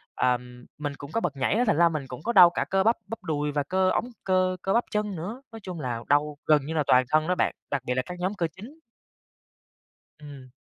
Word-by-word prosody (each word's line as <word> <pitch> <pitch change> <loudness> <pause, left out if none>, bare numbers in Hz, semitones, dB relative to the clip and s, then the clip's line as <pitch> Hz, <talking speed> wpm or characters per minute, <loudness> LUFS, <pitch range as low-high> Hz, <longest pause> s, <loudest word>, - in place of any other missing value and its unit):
ờm, 125 -1 -1
mình 145 -1 -4
cũng 140 +1 -9
có 230 - -1
bật 155 -5 -2
nhảy 135 +6 0
á, 240 - +3
thành 210 - +3
ra 170 0 +5
mình 150 -4 -4
cũng 125 +2 -9
có 235 - -1
đau 180 -5 +9
cả 175 - -2
cơ 195 0 +2
bắp, 225 +3 +4
bắp 225 +2 -7
đùi 150 -1 -1
và 145 0 0
cơ 185 +5 +1
ống, 240 +6 -1
cơ 185 -1 +1
cơ 195 - 0
bắp 235 - +3
chân 210 -2 -1
nữa. 205 +11 -6
Nói 225 - -9
chung 180 -3 -6
là 120 -4 -4
đau 145 0 +2
gần 150 -3 +3
như 160 - -4
là 155 -2 +1
toàn 125 0 +5
thân 155 +1 +2
đó 180 - +1
bạn, - - 0 0.2
đặc 140 -3 0
biệt 125 - 0
là 130 - +1
các 180 0 -8
nhóm 185 +3 -1
cơ 170 -4 0
chính. 255 +11 -12 1.4
Ừm. 140 -3 -11
160 Hz, 255 wpm, -26 LUFS, 140-190 Hz, 1.4 s, đau